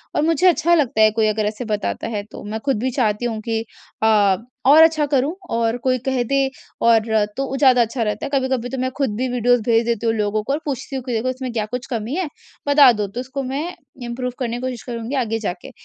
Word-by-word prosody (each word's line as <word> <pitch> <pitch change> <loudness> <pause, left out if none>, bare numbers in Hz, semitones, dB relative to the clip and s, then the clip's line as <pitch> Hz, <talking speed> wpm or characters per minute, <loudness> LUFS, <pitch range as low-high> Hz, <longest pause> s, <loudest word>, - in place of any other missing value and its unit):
और - - +2
मुझे 330 +2 +3
अच्छा 345 -1 +3
लगता 275 -7 +1
है 215 0 +6
कोई 220 0 +1
अगर 215 0 0
ऐसे 215 +3 -3
बताता 210 -1 -2
है 210 -3 -3
तो - - -9
मैं 215 +2 -4
ख़ुद 270 -6 +1
भी 260 +3 -1
चाहती 235 -3 0
हूँ 225 -2 -2
कि 225 0 0 0.4
अ 205 -3 +4 0.3
और 305 +4 +8
अच्छा 315 -2 +3
करूँ 275 +4 +2 0.2
और 230 +1 0
कोई 255 -1 +3
कह 260 -2 +1
दे 275 +4 0 0.5
और 225 -1 +4 0.3
तो 275 - 0
वो 270 - -4
ज़्यादा 260 -3 +5
अच्छा 230 +1 -1
रहता 210 -1 -2
है। - - -4
कभी-कभी 260 -2 0
तो 265 - -4
मैं 260 - 0
ख़ुद 265 -8 0
भी 255 +3 -1
वीडियोज़ 245 -1 +2
भेज 230 0 +2
देती 235 -1 -1
हूँ 225 - +2
लोगों 210 0 0
को 275 - -1
और 300 - -1
पूछती 270 -1 -4
हूँ 260 - -3
कि 250 - -4
देखो 230 +3 0
इसमें 255 0 -4
क्या 215 -2 -1
कुछ 250 +1 -4
कमी 230 +6 -3
है 370 -3 -1 0.4
बता 285 -3 +7
दो 210 -3 -2
तो 200 +5 -7
उसको 265 +2 -4
मैं 290 +4 -2 0.4
इम्प्रूव 250 +1 -3
करने 240 -2 -2
की 245 - -7
कोशिश 255 -3 -4
करूँगी 235 +2 -5
आगे 225 -3 -1
जाके। 180 -4 -5
245 Hz, 245 wpm, -20 LUFS, 220-265 Hz, 0.5 s, और